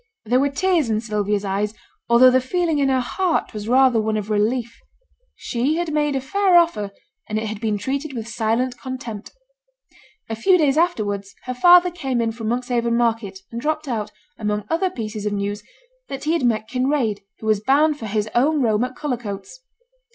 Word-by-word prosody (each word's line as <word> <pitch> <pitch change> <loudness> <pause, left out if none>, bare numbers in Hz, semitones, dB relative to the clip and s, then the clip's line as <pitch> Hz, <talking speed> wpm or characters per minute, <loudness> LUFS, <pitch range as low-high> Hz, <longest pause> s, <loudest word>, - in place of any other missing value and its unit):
There 245 +4 +3
were 280 +1 +2
tears 330 -2 +1
in 215 -1 +1
Sylvia's 210 -2 -1
eyes, 205 +2 -1 0.3
although 245 +2 +7
the 260 0 +3
feeling 325 +3 0
in 275 -1 +2
her 260 -1 +2
heart 355 +7 -1
was 210 0 -6
rather 255 -2 +4
one 215 0 -1
of 210 0 -4
relief. 230 +3 0 0.6
She 255 +6 -1
had 335 -2 -2
made 295 -2 +1
a - - +1
fair 375 +6 +3
offer, 330 -13 +2 0.4
and 215 - -1
it 220 - -2
had 215 0 -5
been 215 -2 0
treated 275 +6 -3
with 230 -3 -5
silent 235 +2 -1
contempt. 245 -5 -6 1.0
A 225 - -3
few 365 - +4
days 290 -5 +2
afterwards, 205 - -1
her 255 - -4
father 355 +6 +6
came 270 -8 -2
in 230 -1 0
from 225 -1 -6
Monkshaven 235 0 0
market, 225 -5 -1
and 235 0 -5
dropped 310 +1 -2
out, 220 -5 -3 0.3
among 210 -1 -1
other 360 +3 +1
pieces 215 - -5
of 205 - -1
news, 205 +1 -2 0.5
that 270 - -6
he 310 +2 +1
had 330 -7 +1
met 220 -2 +1
Kinraid, 255 -4 0 0.2
who - - -10
was 215 -2 +2
bound 290 +6 +2
for 220 - -5
his 210 0 -1
own 295 +5 +3
home 220 -1 +2
at 250 0 -4
Cullercoats. 240 - -5
240 Hz, 190 wpm, -21 LUFS, 215-285 Hz, 1.0 s, although